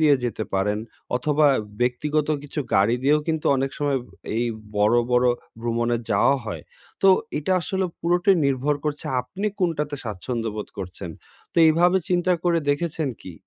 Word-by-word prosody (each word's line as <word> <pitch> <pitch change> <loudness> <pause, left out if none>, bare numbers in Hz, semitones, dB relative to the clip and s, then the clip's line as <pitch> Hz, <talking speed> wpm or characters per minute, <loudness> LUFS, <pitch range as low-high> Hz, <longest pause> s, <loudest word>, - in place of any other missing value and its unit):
দিয়ে 150 -2 +6
যেতে 110 -2 -2
পারেন 105 +2 +1 0.4
অথবা 150 +3 +2 0.3
ব্যক্তিগত 150 +5 0
কিছু 145 +1 -4
গাড়ি 100 +4 +4
দিয়েও 150 +3 +4
কিন্তু 160 -1 -1
অনেক 135 +1 -1
সময় 145 -2 +1 0.4
এই 120 - +1 0.3
বড়ো, 105 +4 +4
বড়ো 125 0 +4 0.3
ভ্রমণে 120 0 0
যাওয়া 105 +7 +4
হয়। 110 - -5 0.4
তো 195 - +6 0.3
এটা 155 +5 -1
আসলে 190 +2 -1 0.2
পুরোটাই 175 +2 +3
নির্ভর 140 +2 +1
করছে 150 -1 -3
আপনি 190 +12 -5
কোনটাতে 150 -4 0
স্বাচ্ছন্দ্য 115 +2 -3
বোধ 105 - -5
করছেন। 90 -2 -6 0.4
তো - - -23
এইভাবে 175 +4 +4
চিন্তা 180 0 +2
করে 170 -1 +3
দেখেছেন 160 -1 -1
কি? 95 - -8
145 Hz, 150 wpm, -24 LUFS, 120-160 Hz, 0.4 s, দিয়ে